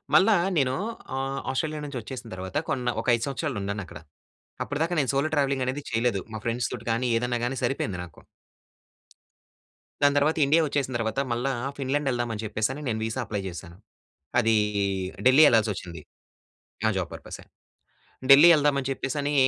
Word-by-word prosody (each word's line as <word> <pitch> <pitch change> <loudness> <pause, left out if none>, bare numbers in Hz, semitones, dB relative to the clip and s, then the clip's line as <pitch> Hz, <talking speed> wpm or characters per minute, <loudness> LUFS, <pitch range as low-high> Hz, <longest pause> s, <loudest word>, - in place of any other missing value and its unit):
మళ్ళా 205 +2 +6 0.2
నేను 130 -3 +2 0.4
ఆహ్, 135 0 -2
ఆస్ట్రేలియా 150 +3 -2
నుంచి 140 -4 -5
వచ్చేసిన 120 +1 -8
తర్వాత 95 0 -5
కొన్న 125 -1 -1
ఒక - - -11
5 115 - -4
సంవత్సరాలు 140 -2 -3
ఉన్నానక్కడ. 100 -6 -5 0.6
అప్పటిదాకా 165 +4 -1
నేను 135 - 0
సోలో 140 +3 +1
ట్రావెలింగ్ 140 -2 +1
అనేది 130 +3 -2
చేయలేదు. 115 -4 +1
మా 110 - -4
ఫ్రెండ్స్ 115 +1 -1
తోటి 115 -2 -7
గాని, 120 +2 0
ఏదైనా 120 +1 -1
గాని 135 - -2
సరిపోయింది 105 -7 -1
నాకు. 85 - -17 1.8
దాని 145 0 +5
తర్వాత 150 +3 +2
ఇండియా 160 +4 +4
వచ్చేసిన 140 -2 -1
తర్వాత, 110 +2 -1
మళ్ళా 120 +3 0 0.3
ఫిన్లాండ్ 140 +1 -1
వెళ్దామని 120 -3 -2
చెప్పేసని 110 +7 -2
నేను 110 -2 -1
వీసా 110 +3 -3
అప్లై 105 -2 -3
చేశాను. 85 0 -10 0.6
అది 115 -2 +3 0.7
ఢిల్లీ 130 +4 +7
వెళ్ళాల్సి 110 -2 +4
వచ్చింది. 85 -3 -8 0.9
ఆ - - +5
జాబ్ 90 -3 -1
పర్పస్ఏ. - - -9 0.9
ఢిల్లీ 145 +5 +10
వెళ్దామని 140 -3 +2
చెప్పేసని 140 +2 -2
130 Hz, 150 wpm, -26 LUFS, 110-140 Hz, 1.8 s, ఢిల్లీ